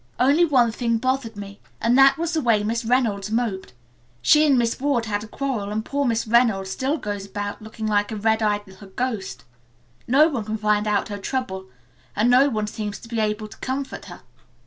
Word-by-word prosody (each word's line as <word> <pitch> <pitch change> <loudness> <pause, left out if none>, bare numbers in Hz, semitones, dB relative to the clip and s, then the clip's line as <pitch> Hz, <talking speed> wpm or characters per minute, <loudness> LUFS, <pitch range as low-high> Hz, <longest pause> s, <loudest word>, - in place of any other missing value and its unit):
"Only 285 +7 +4
one 250 -7 +3
thing 230 0 0
bothered 255 -2 -1
me, 200 0 -9 0.2
and 235 +2 +2
that 270 +1 +6
was 335 +1 -2
the 320 - +1
way 225 -5 +2
Miss 230 +3 -1
Reynolds 225 -5 0
moped. 215 - -2 0.5
She 305 - +5
and 275 -3 +4
Miss 235 -1 0
Ward 265 -4 0
had 205 -1 -2
a - - -9
quarrel 240 -5 -3
and 215 +1 -3
poor 285 0 -1
Miss 230 -2 0
Reynolds 220 -5 +2
still 270 +9 -1
goes 205 -5 -5
about 205 +1 -5
looking 220 0 -7
like 205 -1 +1
a - - -3
red 220 +1 +1
eyed 205 -1 0
little 190 0 -14
ghost. 220 -2 -4 0.6
No 280 +6 +5
one 270 -9 -3
can 215 +1 -3
find 210 0 +1
out 210 +1 0
her 205 -1 -5
trouble 195 -4 -4 0.5
and 225 +4 +3
no 265 +3 +5
one 215 -4 -1
seems 210 -1 -5
to - - -13
be 230 -1 -2
able 215 0 -1
to - - -14
comfort 265 +1 -4
her. - - -11
225 Hz, 210 wpm, -23 LUFS, 210-255 Hz, 0.6 s, that